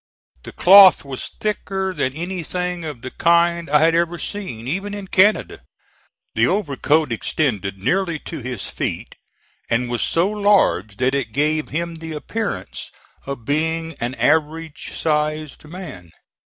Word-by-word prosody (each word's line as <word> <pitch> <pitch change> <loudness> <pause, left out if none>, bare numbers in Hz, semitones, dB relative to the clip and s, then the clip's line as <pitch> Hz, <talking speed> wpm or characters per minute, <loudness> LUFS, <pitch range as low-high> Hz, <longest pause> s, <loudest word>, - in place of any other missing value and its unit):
The - - -10
cloth 190 -3 +7
was 135 -2 -4
thicker 190 -2 -2
than 135 -6 -1
anything 180 +1 -3
of 145 -7 -7
the 130 - -6
kind 170 0 +2
I 150 +1 +4
had 165 +1 +4
ever 170 +1 +1
seen, 145 - -5
even 195 +7 -3
in 200 -2 -7
Canada. 205 +3 +2 0.7
The - - +3
overcoat 155 - +1
extended 105 -5 -1
nearly 170 - 0
to 165 - -6
his 125 -5 -5
feet, - - -4 0.6
and 120 +1 0
was 120 - -1
so 170 +3 +2
large 200 - +2
that 130 +1 +1
it 135 -6 -2
gave 155 +2 0
him 170 +2 -3
the 160 0 -7
appearance 210 +8 -4 0.4
of 140 -5 -6
being 160 +3 -1
an 120 +2 -2
average 160 +1 0
sized 155 -1 -1
man. 150 - -9
160 Hz, 140 wpm, -21 LUFS, 140-180 Hz, 0.7 s, cloth